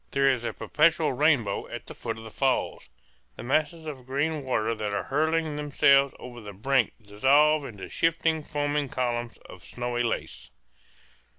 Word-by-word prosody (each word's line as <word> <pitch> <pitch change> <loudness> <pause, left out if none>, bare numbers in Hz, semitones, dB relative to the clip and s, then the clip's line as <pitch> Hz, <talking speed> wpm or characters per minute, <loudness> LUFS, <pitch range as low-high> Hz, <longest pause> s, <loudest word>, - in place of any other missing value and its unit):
There 135 0 +3
is 125 -3 -2
a - - -2
perpetual 155 -1 +2
rainbow 130 -8 +1
at - - -7
the - - -9
foot 115 -2 -5
of 110 - -10
the 110 - -10
falls. 135 +3 -1 0.5
The - - -8
masses 155 +5 0
of 135 -5 -8
green 145 +3 -1
water 115 -4 0
that 105 -2 -3
are - - -1
hurling 155 +1 0
themselves 140 -1 +3
over 120 -1 -10
the 105 -1 -9
brink 125 +3 +1
dissolve 140 +8 +3
into 105 -7 -8
shifting, 165 -1 +1
foaming 145 -1 -2
columns 120 -2 -2
of - - -13
snowy 120 0 -3
lace. 115 - -3
135 Hz, 165 wpm, -27 LUFS, 120-150 Hz, 0.5 s, There